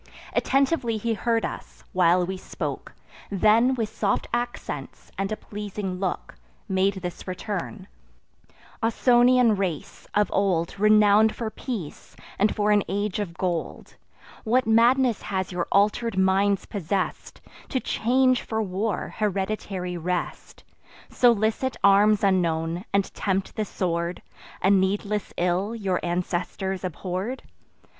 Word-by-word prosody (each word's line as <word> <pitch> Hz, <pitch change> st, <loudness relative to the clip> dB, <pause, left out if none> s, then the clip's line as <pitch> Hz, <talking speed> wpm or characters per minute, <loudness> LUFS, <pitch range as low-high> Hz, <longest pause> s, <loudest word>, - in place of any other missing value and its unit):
Attentively 270 Hz, -4 st, +1 dB
he 230 Hz, +2 st, -1 dB
heard 230 Hz, +1 st, 0 dB
us, -, -, -8 dB
while 180 Hz, 0 st, +4 dB
we 190 Hz, +2 st, -4 dB
spoke; 185 Hz, -, -6 dB, 0.4 s
Then, 220 Hz, +6 st, +4 dB
with 225 Hz, -3 st, -2 dB
soft 200 Hz, -2 st, 0 dB
accents, 240 Hz, 0 st, -4 dB
and 195 Hz, +1 st, -2 dB
a 215 Hz, -, -2 dB
pleasing 205 Hz, -3 st, -5 dB
look, 185 Hz, -2 st, -3 dB, 0.3 s
Made 190 Hz, +1 st, +1 dB
this 180 Hz, +1 st, -6 dB
return: 180 Hz, -, -5 dB, 0.9 s
'Ausonian 240 Hz, 0 st, +4 dB
race, 175 Hz, -7 st, -4 dB
of 210 Hz, -2 st, +2 dB
old 190 Hz, -2 st, 0 dB
Renown'd 215 Hz, +1 st, +5 dB
for 225 Hz, -2 st, -4 dB
peace, 215 Hz, -, -7 dB, 0.2 s
and 210 Hz, +2 st, +2 dB
for 210 Hz, 0 st, +2 dB
an 205 Hz, 0 st, +5 dB
age 205 Hz, +1 st, -1 dB
of 185 Hz, -5 st, -4 dB
gold, 175 Hz, -3 st, -3 dB, 0.5 s
What 250 Hz, +3 st, +2 dB
madness 235 Hz, +1 st, +4 dB
has 190 Hz, -2 st, -3 dB
your 180 Hz, -1 st, -2 dB
alter'd 210 Hz, +2 st, +2 dB
minds 190 Hz, +1 st, +2 dB
possess'd, 195 Hz, -1 st, -3 dB, 0.3 s
To 260 Hz, -, 0 dB
change 255 Hz, +2 st, +2 dB
for 220 Hz, -, -3 dB
war 205 Hz, 0 st, -2 dB
hereditary 195 Hz, -3 st, -2 dB
rest, 180 Hz, +1 st, -4 dB, 0.5 s
Solicit 235 Hz, +2 st, +2 dB
arms 205 Hz, +1 st, +5 dB
unknown, 170 Hz, -2 st, +1 dB
and 200 Hz, -1 st, 0 dB
tempt 195 Hz, -1 st, -2 dB
the 215 Hz, -, -1 dB
sword, 170 Hz, -2 st, -2 dB, 0.4 s
A 190 Hz, -, +5 dB
needless 200 Hz, +2 st, +1 dB
ill 180 Hz, +5 st, 0 dB
your 195 Hz, -5 st, -1 dB
ancestors 180 Hz, +2 st, -2 dB
abhorr'd? 185 Hz, -, -4 dB
200 Hz, 120 wpm, -25 LUFS, 185-220 Hz, 0.9 s, Renown'd